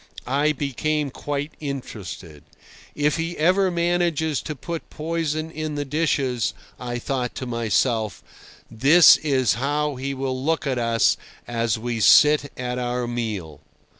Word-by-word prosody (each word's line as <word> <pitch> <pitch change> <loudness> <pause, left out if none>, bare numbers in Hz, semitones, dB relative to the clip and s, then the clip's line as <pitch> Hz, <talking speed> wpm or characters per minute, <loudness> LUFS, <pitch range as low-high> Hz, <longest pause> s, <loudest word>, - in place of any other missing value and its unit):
I 145 +4 +2
became 150 +1 -2
quite 145 +2 -4
interested. 105 - -7 0.5
If 150 +1 +1
he 165 +1 -3
ever 185 +4 +3
manages 170 -3 0
to 155 - -5
put 165 +5 -6
poison 160 0 -3
in 155 -1 -4
the 145 0 -2
dishes, 135 -7 0 0.2
I 120 -1 -4
thought 125 0 -3
to 130 - -5
myself, 115 -2 0 0.5
this 140 +10 +7
is 135 -5 +1
how 145 +3 -1
he 135 +1 -3
will 130 -1 -3
look 160 +2 0
at 130 -3 -1
us 115 -1 +2 0.3
as 115 -1 0
we 115 0 -3
sit 150 +5 +5
at 125 0 -3
our 125 0 -2
meal. 105 - -4
135 Hz, 135 wpm, -23 LUFS, 120-155 Hz, 0.5 s, this